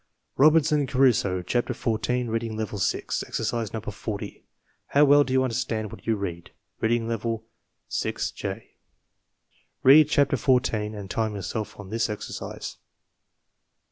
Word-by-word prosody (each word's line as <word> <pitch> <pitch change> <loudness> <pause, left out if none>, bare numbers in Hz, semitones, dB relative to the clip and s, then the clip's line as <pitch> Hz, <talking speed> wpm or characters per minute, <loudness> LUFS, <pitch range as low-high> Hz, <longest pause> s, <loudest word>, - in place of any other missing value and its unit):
Robinson 150 0 +4
Crusoe, 120 -9 +2
Chapter 120 +6 -1
H, 110 -2 -1 0.2
Reading 115 -1 -2
Level 110 -2 -3
VI, 100 +2 0 0.2
Exercise 115 -3 -2
No. 110 - -3
Jfi 110 -1 -6 0.5
How 145 +1 +5
well 145 +1 +6
do 135 - -6
you 130 0 +3
understand 115 -4 -2
what - - -12
you 115 - +3
read? 90 -4 -5 0.3
Reading 115 0 +1
Level 115 0 -2 0.5
VI - - -1 0.2
J - - -6 1.1
Read 145 +3 +8
Chapter 140 -3 +3
14 120 -6 +1
and 100 -2 -7
time 110 +1 -1
yourself 100 +4 -5
on 100 -1 -9
this 115 +1 0
exercise. 105 - -6
115 Hz, 135 wpm, -26 LUFS, 105-130 Hz, 1.1 s, Read